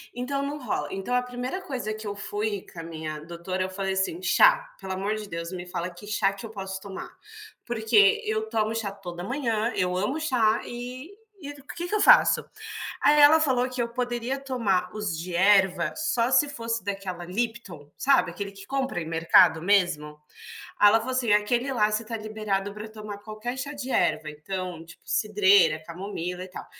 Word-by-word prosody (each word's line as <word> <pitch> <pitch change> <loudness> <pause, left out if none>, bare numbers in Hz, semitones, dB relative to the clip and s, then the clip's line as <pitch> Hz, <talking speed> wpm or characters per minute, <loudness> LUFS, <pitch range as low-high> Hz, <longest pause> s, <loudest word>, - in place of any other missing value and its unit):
então 275 +3 -2
não 285 +1 -3
rola, 225 - -2
então 195 +6 -4
a 250 - +3
primeira 250 +8 -5
coisa 255 - -4
que 215 0 -7
eu 205 - -4
fui 205 0 -3
com 170 - -9
a 165 - -5
minha 155 -2 -6
doutora 170 +3 -5
eu 185 - -3
falei 195 0 -2
assim: 190 -3 -1
"Chá, - - +5
pelo 190 0 -5
amor 200 +3 -1
de 215 -1 -6
Deus 170 +1 -5
me 180 -1 -6
fala 180 0 -3
que 175 +4 -13
chá 205 -2 +1
que 195 - -10
eu - - -7
posso 190 -2 -6
tomar, 200 -2 -7 0.6
porque 220 -4 +4
eu 220 0 -1
tomo 220 -1 0
chá 225 -3 -2
toda 175 -3 -8
manhã, 230 -1 -1
eu 180 0 0
amo 210 +12 -1
chá 240 -8 +2
e 250 +5 -7 0.5
o 275 - -16
que 345 +1 -4
que 355 - -6
eu 425 - +2
faço?". - - +6 0.6
Aí 295 0 +5
ela 305 +2 +8
falou 255 -4 +2
que 255 -1 -3
eu 235 - -4
poderia 245 +2 -2
tomar 210 -9 0
os 210 -5 -2
de 170 +1 -5
erva 190 0 +4
só 255 -6 0
se 290 - +4
fosse 230 -4 -3
daquela 195 -3 -4
lipton, 190 -7 -4
sabe, 180 -11 +3
aquele 200 +3 -6
que 195 0 -12
compra 270 -7 -2
em 160 - -4
mercado 165 0 +5
mesmo. 170 -6 +1 0.6
Ela 210 +2 +7
falou 260 +3 -4
assim 250 -4 +1
aquele 240 +6 +1
lá 215 -3 +2
você 215 - +1
está 225 +1 -5
liberado 215 -2 -3
para 215 +1 -8
tomar 210 -2 -8
qualquer 215 +4 -6
chá 280 +3 -4
de 265 -2 -5
erva, 155 - +1
então, 175 +2 -5
tipo, 170 +1 -15
cidreira, 200 -6 +4
camomila 180 0 -5
e 185 - -8
tal. 180 - -8
210 Hz, 195 wpm, -26 LUFS, 185-245 Hz, 0.6 s, ela